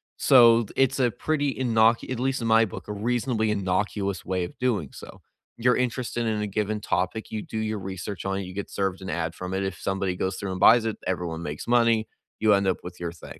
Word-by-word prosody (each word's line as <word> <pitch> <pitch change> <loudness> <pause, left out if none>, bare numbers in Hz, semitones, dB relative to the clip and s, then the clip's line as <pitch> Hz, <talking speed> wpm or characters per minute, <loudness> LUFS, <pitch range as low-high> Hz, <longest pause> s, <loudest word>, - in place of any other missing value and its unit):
So, 115 -3 +6
it's 135 0 +2
a 120 -2 +3
pretty 145 +4 -1
innoc 115 -2 +2
at 130 -2 -3
least 135 +1 0
in 115 - -1
my 115 0 +5
book, 100 - -9
a 105 - -4
reasonably 115 0 0
innocuous 100 0 -1
way 90 -1 -1
of 85 - -12
doing 110 - 0
so. - - -12 0.4
You're 125 +1 +3
interested 120 -1 -1
in 110 -2 -1
a 105 - -1
given 105 +1 -2
topic, 95 +3 -2
you 110 - -4
do 110 - -7
your 110 -1 -2
research 95 0 -6
on 95 0 -1
it, 100 - -3
you 90 - -8
get 100 +1 -5
served 95 -1 -2
an 95 - -6
ad 80 -1 -2
from 90 0 -5
it. 95 +1 -1
If 95 -1 -4
somebody 95 -1 -1
goes 95 +1 -2
through 100 -2 -4
and 95 - -4
buys 115 0 +7
it, 110 - -2
everyone 85 -3 -3
makes 75 +5 -6
money. 115 -2 +3 0.3
You 110 -1 +4
end 100 -1 +2
up 95 - +1
with 90 0 -9
your 85 -1 -3
thing. 85 - -12
105 Hz, 235 wpm, -25 LUFS, 95-115 Hz, 0.4 s, buys